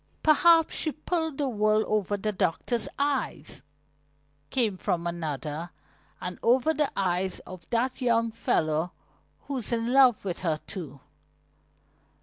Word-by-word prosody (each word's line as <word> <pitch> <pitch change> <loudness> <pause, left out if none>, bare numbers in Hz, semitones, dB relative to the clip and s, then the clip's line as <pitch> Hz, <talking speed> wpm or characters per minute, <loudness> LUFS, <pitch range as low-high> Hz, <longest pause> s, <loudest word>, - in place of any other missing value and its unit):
"Perhaps 325 +1 +5
she 310 - 0
pulled 320 -2 -2
the 285 - 0
wool 215 -2 +2
over 205 -1 0
the 215 +2 -2
doctor's 210 +5 -1
eyes," 275 - -2 0.9
came 225 -6 +1
from 175 -2 -2
another. 160 -1 -4 0.5
"And 180 0 -6
over 255 +6 +3
the 300 -2 0
eyes 185 -1 0
of 180 -3 -12
that 250 +3 -1
young 230 -2 +2
fellow 160 -6 0 0.5
who's 265 -6 -4
in 235 +1 0
love 255 -6 +5
with 180 -3 -3
her, 160 -4 -1
too." 150 -9 -8
215 Hz, 130 wpm, -27 LUFS, 175-260 Hz, 0.9 s, Perhaps